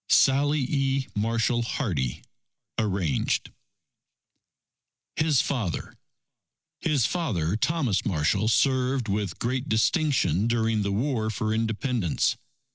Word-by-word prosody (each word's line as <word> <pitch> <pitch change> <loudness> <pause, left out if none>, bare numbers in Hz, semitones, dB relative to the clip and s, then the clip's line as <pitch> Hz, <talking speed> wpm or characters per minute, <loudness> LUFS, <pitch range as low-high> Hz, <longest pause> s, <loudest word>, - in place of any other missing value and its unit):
Sallie 140 +1 +4
E. 135 -1 0
Marshall 115 +3 +1
Hardy 90 - -2 0.6
(Arranged) 95 -8 0 1.6
HIS 155 -4 +3
FATHER 110 -11 -3 0.8
His 145 -8 +1
father, 105 - -1
Thomas 130 - 0
Marshall, 95 +4 +1
served 130 0 +2
with 100 -3 -2
great 125 +3 -2
distinction 110 - +2
during 115 -2 +1
the 100 0 -1
War 110 +1 0
for 110 +1 -1
Independence. 110 - 0
115 Hz, 95 wpm, -26 LUFS, 100-135 Hz, 1.6 s, Sallie